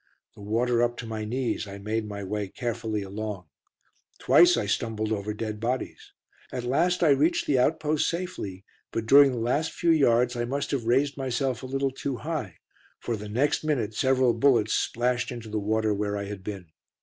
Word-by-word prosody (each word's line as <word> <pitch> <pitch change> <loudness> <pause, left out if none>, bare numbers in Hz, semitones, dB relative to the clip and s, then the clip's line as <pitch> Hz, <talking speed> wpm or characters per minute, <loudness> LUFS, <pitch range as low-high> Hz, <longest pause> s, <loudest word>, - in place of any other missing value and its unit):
The - - -14
water 115 +3 +1
up 120 0 +1
to 120 - -6
my 110 -1 -4
knees, 120 -2 -2
I 100 0 -8
made 105 +2 -3
my 100 -1 -6
way 105 +1 -3
carefully 110 -1 -3
along. 100 -1 -5 0.7
Twice 175 0 +5
I - - 0
stumbled 110 +1 -1
over 105 -1 -2
dead 105 0 -4
bodies. 125 +3 -3 0.4
At 125 - -4
last 175 +9 +1
I 160 - +5
reached 145 +5 +3
the 135 -3 +2
outpost 155 +2 +1
safely, 165 - -5 0.3
but 115 - -2
during 140 +3 +7
the 125 - -4
last 125 +7 0
few 170 - +1
yards 125 -5 +3
I 120 - -1
must 140 +4 -3
have 135 -5 -1
raised 140 +4 +2
myself 130 -1 -1
a 130 - -6
little 135 +1 -1
too 135 0 -4
high, 150 - -4 0.4
for 120 - -3
the 105 -1 -7
next 135 +9 +1
minute 125 -9 -1
several 130 +1 +3
bullets 115 -3 +3
splashed 125 +1 0
into 120 -3 -7
the 105 0 -2
water 110 +1 +1
where 105 0 -2
I 100 - -3
had 100 -1 -7
been. 95 -5 -7
120 Hz, 190 wpm, -26 LUFS, 105-135 Hz, 0.7 s, during